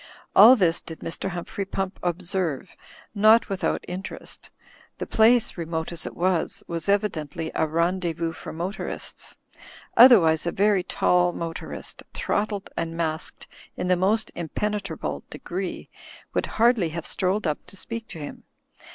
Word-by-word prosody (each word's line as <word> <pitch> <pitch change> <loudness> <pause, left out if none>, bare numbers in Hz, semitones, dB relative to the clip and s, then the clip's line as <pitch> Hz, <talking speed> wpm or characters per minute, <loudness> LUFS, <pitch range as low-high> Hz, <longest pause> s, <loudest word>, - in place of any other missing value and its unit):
All 225 +6 +10
this 175 -7 +2
did 160 - -10
Mr. 165 +3 -3
Humphrey 175 +2 -4
Pump 195 0 -4
observe, 175 -1 -2 0.4
not 215 +2 +5
with 195 -1 -4
out - - 0
interest 185 +2 -7 0.5
The - - -4
place, 225 -3 +3
remote 160 0 -3
as 170 -2 -1
it - - -8
was, 180 -1 0
was 165 +1 -4
evident 195 -8 0
ly 160 -1 -3
a 160 - +1
rendeZ'Vous 170 0 0
for - - -8
motorists. 175 +5 -5 0.6
Otherwise 175 -11 +7
a - - +1
very 200 -1 +3
tall 180 0 +2
motorist, 165 -1 -6
throttled 205 -1 -2
and 165 0 -3
masked 160 -1 -3 0.3
in 180 - -2
the 180 - +5
most 205 +5 +1
impenetra 195 +1 -3
ble - - -4
degree, 180 +1 -5 0.5
would - - 0
hardly 225 -6 +4
have 170 +1 -5
strolled 195 +2 0
up 150 -2 -1
to 195 - -11
speak 230 +3 -5
to 170 - -9
him. 145 -2 -8
180 Hz, 150 wpm, -25 LUFS, 165-200 Hz, 0.6 s, All